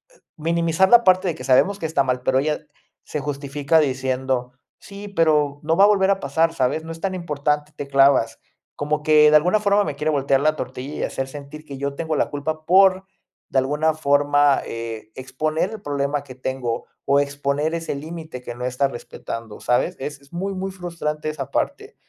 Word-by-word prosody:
e - - -26 0.2
minimizar 170 +3 +1
la 240 0 +7
parte 185 -1 +4
de 170 - -1
que - - -9
sabemos 165 +10 +3
que 165 - -4
está 155 -3 +1
mal. 125 -1 -1
Pero 130 - +2
ella 150 +2 0 0.4
se 150 - -4
justifica 140 +2 0
diciendo: 130 -2 -1 0.3
"Sí, 200 +1 -10
pero 150 -6 +2
no 160 +2 +1
va 195 - +7
a - - +6
volver 195 -2 +3
a 195 - +1
pasar, 165 +3 +1
¿sabes? 150 +1 0
No 165 - -7
es 165 0 -9
tan 190 -1 -2
importante. 150 -3 -1
Te 145 - -6
clavas". 135 -4 +3 0.4
Como 150 +1 -1
que 150 0 +6
de - - +6
alguna 180 +7 +2
forma 205 0 +3
me 145 - -4
quiere 150 +2 -1
voltear 140 -2 +2
la 155 +1 +2
tortilla 130 +1 -6
y - - -3
hacer 135 - -3
sentir 145 +2 -10
que 140 -2 -8
yo 140 0 -3
tengo 160 0 -2
la - - +1
culpa 155 +2 -4
por, 190 +1 +5 0.4
de - - -1
alguna 150 +4 +1
forma, 145 -1 +3
eh, 115 -1 -6
exponer 155 +8 -2
el 220 - -8
problema 145 0 -2
que 130 - -12
tengo, 130 -2 -3 0.2
o 140 +1 +4
exponer 145 +2 -1
ese 165 -3 -3
límite 155 -2 -7
que 120 - -6
no 125 - -7
está 125 +2 +1
respetando, 115 -3 -8
¿sabes? 125 - +1
Es 140 +1 -6
es 140 - -22
muy, 195 +3 -3
muy 190 0 -4
frustrante 170 -4 -4
esa 145 -4 -5
parte. - - -3
150 Hz, 200 wpm, -22 LUFS, 135-165 Hz, 0.4 s, la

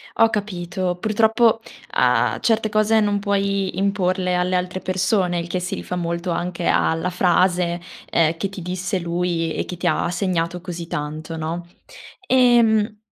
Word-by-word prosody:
Ho 225 0 +5
capito. 180 -3 -3
Purtroppo 220 +2 +3 0.3
a 120 -2 +2
certe 225 -1 +2
cose 215 +1 +3
non 205 -1 +1
puoi 200 -2 -1
imporle 185 -2 0
alle 180 +1 +1
altre 180 +1 -2
persone, 185 -1 0
il 170 - -4
che 180 +1 -2
si 180 +1 -3
rifà 180 - -5
molto 170 0 -2
anche 175 +1 -3
a - - +3
la 180 +3 -2
frase, 180 -1 +2 0.3
ehm, 165 0 +2
che 195 +3 -2
ti 195 -2 -8
disse 185 +2 -2
lui 170 -1 -1
e - - -2
che 180 - -7
ti 175 +1 -1
ha 170 - +1
segnato 175 -1 -1
così 175 -2 -6
tanto, 155 +2 -5
no? 165 +2 -4 0.6
Ehm, 230 -4 +4
180 Hz, 160 wpm, -21 LUFS, 170-200 Hz, 0.6 s, Ho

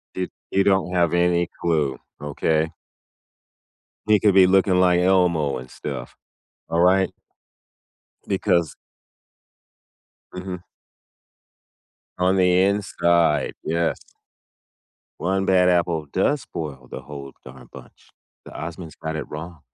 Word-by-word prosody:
Di 90 -1 -3 0.2
You 95 - +3
don't 95 -2 +1
have 85 -2 +2
any 85 0 +2
clue, 75 -5 0 0.2
okay? 80 +2 0 1.4
He 105 -1 +5
could 100 -1 +3
be 95 -1 +8
looking 95 0 +3
like 90 -1 +4
Elmo 90 -6 +2
and 65 0 -10
stuff. - - -7 0.6
Alright? 90 +3 +3 1.2
Because 85 -2 +1 1.6
Mhm. 90 -1 -6 1.6
On 95 +1 +2
the 90 0 +4
inside, 85 -5 +1
yes. 85 +1 0 1.2
One 95 +2 0
bad 90 -1 +4
apple 85 -3 +1
does 140 +9 +1
spoil 70 - -7
the 65 - -6
whole 70 0 -9
darn 65 0 -13
bunch. - - -15 0.3
The - - -12
Osmonds 85 +1 -8
got 80 0 -3
it 80 - -5
wrong. 80 +1 -8
85 Hz, 110 wpm, -23 LUFS, 80-95 Hz, 1.6 s, be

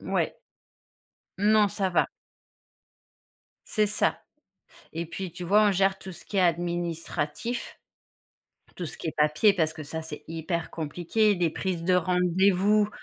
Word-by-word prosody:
Mouais. - - -1 1.0
Non, 210 +1 +4
ça 195 +1 -1
va. 180 - +2 1.6
C'est 215 -1 +1
ça 210 - +1 0.7
et 165 +1 -4
puis 185 +2 -5
tu 180 +2 -7
vois, 205 +5 +5
on - - +4
gère 195 0 +2
tout 190 - -8
ce 175 - -11
qui 205 - -6
est - - +4
administratif 170 +3 -2 1.0
tout 175 - -4
ce - - -8
qui - - -5
est - - -2
papier 150 +7 +4
parce 160 -5 0
que 160 -1 -8
ça, 160 +2 -5
c'est 150 -2 -8
hyper 165 +1 -3
compliqué. 175 +7 +1
Des 175 -3 +1
prises 180 0 -3
de 185 - +3
rendez-vous 185 +3 +3
180 Hz, 145 wpm, -27 LUFS, 165-195 Hz, 1.6 s, vois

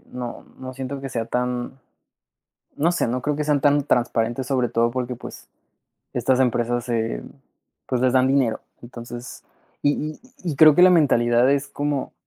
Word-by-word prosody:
no 125 -1 -7
no 130 0 -7
siento 135 +1 -6
que 135 - -5
sea 115 -1 -3
tan, 125 +2 -3 1.0
no 165 +4 +2
sé, 170 - 0
no 125 +2 -2
creo 150 -1 -1
que 150 - -2
sean 145 -2 +1
tan 145 0 +4
transparentes, 120 -1 0
sobre 125 -2 0
todo 115 0 +1
porque, 125 0 -3
pues, - - -11 0.7
estas 130 0 +1
empresas 120 -1 +1
se 115 - -2 0.6
pues, 125 - -1
les 130 0 +2
dan 130 0 +4
dinero. 130 -4 +1 0.2
Entonces, 120 0 -9 0.4
y 145 - +4 0.2
y - - -18 0.2
y 165 -6 -3
creo 155 0 +8
que - - +3
la 185 - +9
mentalidad 125 -7 +3
es 140 0 -1
como: 145 -1 -3
130 Hz, 170 wpm, -22 LUFS, 120-140 Hz, 1.0 s, la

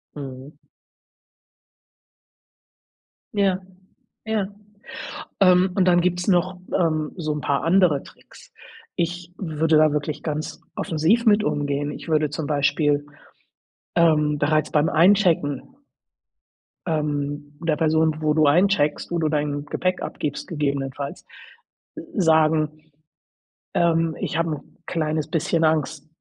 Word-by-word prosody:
Mhm. 135 0 -8 2.8
Ja, 195 -2 +2 0.7
ja, 220 -3 -1 0.9
ähm, 185 -1 +5
und 185 -2 +2
dann 175 -1 +4
gibt's 180 +1 -1
noch, 180 0 +2 0.2
ähm, 155 -4 0
so 155 -4 -2
'n 150 - -3
paar 140 -1 -1
andere 170 -4 +3
Tricks. - - -17 0.4
Ich 175 +1 -3
würde 160 -3 +1
da 155 0 +5
wirklich 150 0 -3
ganz 155 +2 -4 0.2
offensiv 170 +10 +1
mit 210 -1 +5
umgehen. 145 -5 -1
Ich - - -9
würde 155 -1 +2
zum 150 +1 -4
Beispiel, 145 0 +1 0.9
ähm, 150 -3 +3
bereits 155 +1 +1
beim 150 +1 +2
Einchecken 165 -5 +3 1.3
ähm, 145 -2 -2
der 155 -2 +1
Person, 160 0 +2
wo 155 -1 +1
du 155 0 +3
eincheckst, 155 0 +2
wo 175 - -1
du 160 -2 +1
dein 145 -1 -1
Gepäck 185 +4 -1
abgibst, 145 -2 -4
gegebenenfalls, 140 -1 -3 0.7
äh, - - -7
sagen 160 -4 +3 1.1
„Ähm, 165 -2 +2
ich 160 - -2
habe 165 -1 0
'n 150 - -8
kleines 155 -2 -1
bisschen 165 +1 0
Angst 155 -2 0
155 Hz, 115 wpm, -23 LUFS, 150-175 Hz, 2.8 s, ähm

